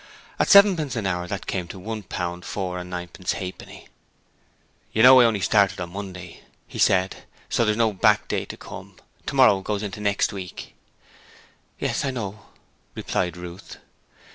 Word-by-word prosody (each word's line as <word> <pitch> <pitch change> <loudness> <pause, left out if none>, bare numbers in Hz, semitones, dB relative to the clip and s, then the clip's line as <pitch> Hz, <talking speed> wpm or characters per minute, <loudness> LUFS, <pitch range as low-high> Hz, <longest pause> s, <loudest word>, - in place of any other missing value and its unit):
At - - +2
sevenpence 185 -9 +6
an 110 -4 -2
hour 90 -2 -1
that 100 0 -5
came 90 -2 -3
to 95 - -9
one 110 +3 -5
pound 90 -2 -5
four 90 -2 -4
and 90 0 -8
ninepence 90 0 -4
halfpenny. 95 -1 -8 1.1
'You 110 - +3
know 130 +1 +10
I - - +6
only 110 -4 +1
started 100 -1 +3
on 85 -1 -5
Monday,' 90 -3 -8 0.2
he - - -9
said, 95 0 +3 0.3
'so 115 - +2
there's 105 0 +1
no 115 -2 +2
back 95 - +3
day - - -2
to - - -9
come. - - -10 0.3
Tomorrow 125 -8 +4
goes 105 +1 -3
into 105 0 -6
next 100 0 +1
week.' 95 -3 -8 1.0
'Yes, - - -1
I 140 - 0
know,' 105 -5 -6 0.5
replied 90 -1 -2
Ruth. 90 +2 -9
100 Hz, 165 wpm, -24 LUFS, 90-110 Hz, 1.1 s, know